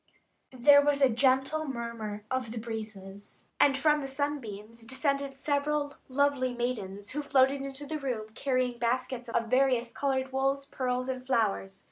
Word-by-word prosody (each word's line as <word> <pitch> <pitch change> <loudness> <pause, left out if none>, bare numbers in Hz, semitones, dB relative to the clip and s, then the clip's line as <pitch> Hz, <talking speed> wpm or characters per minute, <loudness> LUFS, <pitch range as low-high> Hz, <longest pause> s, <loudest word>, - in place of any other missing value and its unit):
There 285 +3 +7
was 290 -1 +2
a 270 -2 +5
gentle 265 +5 +2
murmur 230 -5 -5
of 260 -3 -1
the 235 - -6
breezes, 215 -3 -7
and 275 -2 +5
from 300 +1 +3
the 275 - -4
sunbeams 235 -6 -4
descended 275 +3 -1
seven 290 +1 0 0.2
lovely 265 -2 +1
maidens, 205 -5 -3
who 295 - -2
floated 275 -1 +3
into 275 +1 -6
the 305 +2 -4
room, 240 -6 -3
carrying 255 -2 0
baskets 250 +1 -1
of 230 0 -1
various 255 -2 +2
coloured 265 -1 -1
wools, 270 +1 0
pearls, 255 -2 -2
and 255 -1 -3
flowers. 205 -6 0
260 Hz, 150 wpm, -29 LUFS, 230-275 Hz, 0.2 s, There